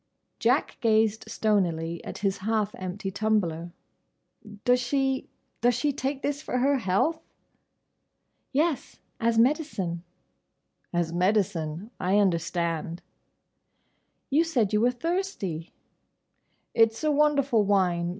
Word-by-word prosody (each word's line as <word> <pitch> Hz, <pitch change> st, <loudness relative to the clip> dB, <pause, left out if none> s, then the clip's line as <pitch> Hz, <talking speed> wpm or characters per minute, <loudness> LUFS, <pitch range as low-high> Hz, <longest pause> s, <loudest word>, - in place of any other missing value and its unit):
Jack -, -, +1 dB
gazed 220 Hz, -2 st, +2 dB
stonily 175 Hz, -7 st, 0 dB
at -, -, -7 dB
his 195 Hz, -1 st, -1 dB
half 210 Hz, +1 st, 0 dB
empty 185 Hz, +1 st, -5 dB
tumbler. 185 Hz, -5 st, 0 dB, 0.9 s
"Does 250 Hz, 0 st, +4 dB
she—does 260 Hz, -2 st, -1 dB
she 285 Hz, +4 st, 0 dB
take 270 Hz, 0 st, -3 dB
this 285 Hz, 0 st, -1 dB
for 250 Hz, -, -2 dB
her 275 Hz, +2 st, +3 dB
health?" 235 Hz, -, +1 dB, 1.3 s
"Yes. 300 Hz, 0 st, 0 dB, 0.2 s
As 230 Hz, 0 st, +1 dB
medicine." 225 Hz, -, +1 dB, 0.9 s
"As 170 Hz, -1 st, -1 dB
medicine—I 180 Hz, 0 st, 0 dB
understand." 170 Hz, -3 st, 0 dB, 1.3 s
"You 305 Hz, +4 st, +4 dB
said 245 Hz, -12 st, 0 dB
you 210 Hz, -, +3 dB
were 240 Hz, -, +4 dB
thirsty." 250 Hz, -, -3 dB, 1.0 s
"It's 225 Hz, +3 st, +3 dB
a 305 Hz, -, +3 dB
wonderful 285 Hz, -5 st, +3 dB
wine. 180 Hz, -4 st, +2 dB
215 Hz, 100 wpm, -27 LUFS, 180-265 Hz, 1.3 s, Does